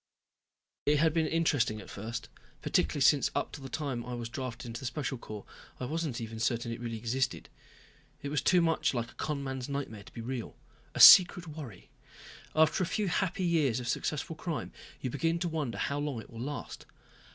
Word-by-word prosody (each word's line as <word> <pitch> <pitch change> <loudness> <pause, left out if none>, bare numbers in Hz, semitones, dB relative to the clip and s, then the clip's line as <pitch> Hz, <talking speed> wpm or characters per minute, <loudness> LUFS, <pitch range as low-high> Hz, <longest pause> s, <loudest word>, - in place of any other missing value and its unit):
It 150 +1 +5
had 155 +1 +3
been 160 -1 +2
interesting 145 -9 +1
at 95 - -10
first. 110 +3 -6 0.4
Particularly 145 - +1
since 140 +1 +5
up - - 0
until - - -9
the - - -6
time 135 -6 -3
I 125 0 -5
was 120 -1 -5
drafted 130 -1 -5
into 115 0 -6
the 130 - -4
Special 130 0 -3
Corps 105 -3 -8 0.3
I 125 - -3
wasn't 155 -3 -2
even 115 -1 -6
certain 120 0 0
it 115 - -5
really 115 -1 -4
existed. 120 +3 -2 0.7
It 140 - -3
was 145 -1 0
too 180 -1 +4
much 165 -4 +1
like 120 -1 -2
a - - -20
con 150 -2 -3
man's 130 -1 -4
nightmare 140 -7 -4
to - - -14
be 115 - -7
real. 120 0 -5 0.4
A - - -3
secret 180 -1 +10
worry. 145 - -9 0.6
After 160 +2 +4
a - - -1
few 205 +1 -1
happy 185 +1 0
years 155 -9 +2
of 125 - -6
successful 150 +5 -2
crime 165 -1 -4 0.3
you 130 - -2
begin 165 +4 0
to 175 - -1
wonder 150 -10 -2
how 140 +7 -1
long 145 -5 -2
it - - -12
will 115 - -8
last. 145 +3 -6
135 Hz, 200 wpm, -31 LUFS, 120-155 Hz, 0.7 s, secret